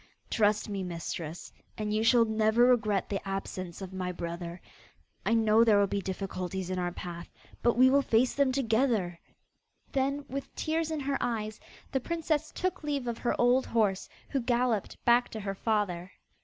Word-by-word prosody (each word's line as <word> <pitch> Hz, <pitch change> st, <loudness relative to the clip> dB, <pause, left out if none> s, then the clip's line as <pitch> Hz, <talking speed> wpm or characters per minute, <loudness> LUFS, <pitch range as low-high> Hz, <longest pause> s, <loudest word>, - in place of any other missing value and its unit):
Trust 210 Hz, 0 st, +2 dB
me, 200 Hz, -2 st, -3 dB
mistress, 170 Hz, -2 st, -5 dB, 0.2 s
and 210 Hz, -1 st, -2 dB
you 215 Hz, +1 st, +1 dB
shall 230 Hz, 0 st, +5 dB
never 220 Hz, +2 st, +3 dB
regret 215 Hz, -6 st, +2 dB
the 195 Hz, -, -2 dB
absence 195 Hz, -2 st, -5 dB
of 190 Hz, 0 st, -8 dB
my 185 Hz, -1 st, -2 dB
brother. 170 Hz, 0 st, -5 dB, 0.7 s
I 230 Hz, -, +4 dB
know 220 Hz, 0 st, +5 dB
there 220 Hz, -3 st, +5 dB
will 200 Hz, -, +5 dB
be 200 Hz, 0 st, -2 dB
difficulties 190 Hz, -1 st, -4 dB
in 185 Hz, -, -1 dB
our 175 Hz, 0 st, -1 dB
path, 170 Hz, -1 st, -7 dB, 0.3 s
but 235 Hz, 0 st, +2 dB
we 255 Hz, +1 st, +7 dB
will 280 Hz, +1 st, +5 dB
face 245 Hz, -1 st, +2 dB
them 280 Hz, -2 st, +2 dB
together.' 225 Hz, -8 st, +1 dB, 0.7 s
Then, 275 Hz, +1 st, 0 dB
with 275 Hz, +1 st, -6 dB
tears 320 Hz, 0 st, -1 dB
in 315 Hz, -2 st, -2 dB
her 275 Hz, 0 st, -1 dB
eyes, 215 Hz, -3 st, -2 dB, 0.3 s
the 265 Hz, -, +1 dB
princess 315 Hz, +1 st, -1 dB
took 370 Hz, -1 st, -2 dB
leave 285 Hz, -3 st, -1 dB
of 235 Hz, -1 st, -3 dB
her 240 Hz, -, -1 dB
old 245 Hz, +2 st, +4 dB
horse, 210 Hz, -5 st, +1 dB, 0.2 s
who 275 Hz, -, 0 dB
galloped 240 Hz, -3 st, 0 dB
back 240 Hz, +1 st, +4 dB
to 220 Hz, -, -6 dB
her 195 Hz, -1 st, -3 dB
father. 195 Hz, -4 st, -1 dB
220 Hz, 175 wpm, -30 LUFS, 190-255 Hz, 0.7 s, we